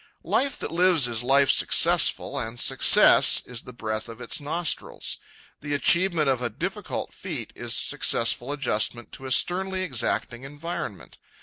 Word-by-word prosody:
Life 275 Hz, 0 st, -1 dB
that -, -, -6 dB
lives 170 Hz, -5 st, +3 dB
is 120 Hz, -1 st, -1 dB
life 135 Hz, +2 st, +3 dB
successful, -, -, +2 dB
and 115 Hz, -1 st, -6 dB
success -, -, +5 dB
is 125 Hz, -2 st, -5 dB
the -, -, -12 dB
breath 110 Hz, -1 st, -5 dB
of 115 Hz, 0 st, -11 dB
its 125 Hz, +4 st, -2 dB
nostrils. 165 Hz, +3 st, -2 dB, 0.4 s
The 145 Hz, 0 st, -4 dB
achievement 170 Hz, +1 st, +3 dB
of 130 Hz, -2 st, 0 dB
a 120 Hz, -, -2 dB
difficult 105 Hz, -, -5 dB
feat -, -, -8 dB
is -, -, -3 dB
successful 120 Hz, +3 st, +1 dB
adjustment 120 Hz, -4 st, -2 dB
to 135 Hz, -, -9 dB
a -, -, -7 dB
sternly 185 Hz, +6 st, 0 dB
exacting 120 Hz, -5 st, -3 dB
environment. 145 Hz, -, -8 dB
135 Hz, 145 wpm, -24 LUFS, 120-165 Hz, 0.4 s, success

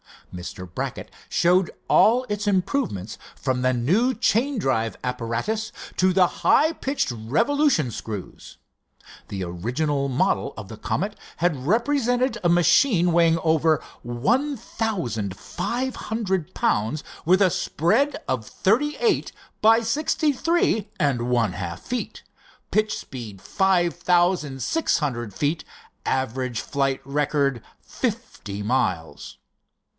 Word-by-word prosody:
Mr. 90 Hz, +1 st, -7 dB
Brackett 85 Hz, -, -5 dB, 0.2 s
showed 180 Hz, +1 st, +3 dB, 0.2 s
all 245 Hz, +4 st, +5 dB
its 205 Hz, 0 st, -2 dB
improvements, 185 Hz, -, -1 dB, 0.2 s
from 130 Hz, -2 st, -1 dB
the 130 Hz, 0 st, +2 dB
new 190 Hz, -, +2 dB
chain 250 Hz, +4 st, +1 dB
drive 115 Hz, -, 0 dB
apparatus 125 Hz, -, -2 dB, 0.3 s
to 185 Hz, 0 st, +4 dB
the 185 Hz, 0 st, +5 dB
high 305 Hz, -, +3 dB
pitch 275 Hz, -, -2 dB
revolution 155 Hz, -, +1 dB
screws. 105 Hz, -3 st, -7 dB, 0.7 s
The 95 Hz, -2 st, -4 dB
original 130 Hz, -, -1 dB
model 130 Hz, -2 st, 0 dB
of -, -, -8 dB
the -, -, -8 dB
Comet -, -, -2 dB, 0.2 s
had 150 Hz, -6 st, 0 dB
represented 245 Hz, +1 st, +1 dB
a 175 Hz, -, +3 dB
machine 175 Hz, +2 st, +4 dB
weighing 165 Hz, -1 st, +4 dB
over 160 Hz, -1 st, +2 dB, 0.2 s
one 240 Hz, -, 0 dB
thousand 130 Hz, -, -3 dB
five 255 Hz, +2 st, -3 dB
hundred 190 Hz, -6 st, -2 dB
pounds 110 Hz, +9 st, 0 dB, 0.2 s
with 185 Hz, +4 st, +4 dB
a 185 Hz, -3 st, +5 dB
spread 225 Hz, -, +1 dB
of 120 Hz, -4 st, -1 dB
thirty 275 Hz, +10 st, +1 dB
eight 460 Hz, -, +1 dB, 0.3 s
by 225 Hz, +2 st, +6 dB
sixty 300 Hz, +6 st, +1 dB
three 270 Hz, -, +1 dB
and 125 Hz, -4 st, +1 dB
one 120 Hz, -5 st, +2 dB
half 85 Hz, 0 st, -5 dB
feet, 250 Hz, -1 st, -5 dB, 0.5 s
pitch 215 Hz, 0 st, +1 dB
speed 115 Hz, -7 st, -8 dB
five 185 Hz, -4 st, +2 dB
thousand 175 Hz, -5 st, +1 dB
six 325 Hz, -1 st, +1 dB
hundred 120 Hz, -, -3 dB
feet, 150 Hz, -, -1 dB, 0.4 s
average 130 Hz, -2 st, -1 dB
flight 135 Hz, -2 st, -1 dB
record 140 Hz, -2 st, 0 dB, 0.2 s
fifty 100 Hz, -1 st, -4 dB
miles. 80 Hz, -, -2 dB
165 Hz, 120 wpm, -24 LUFS, -, 0.7 s, by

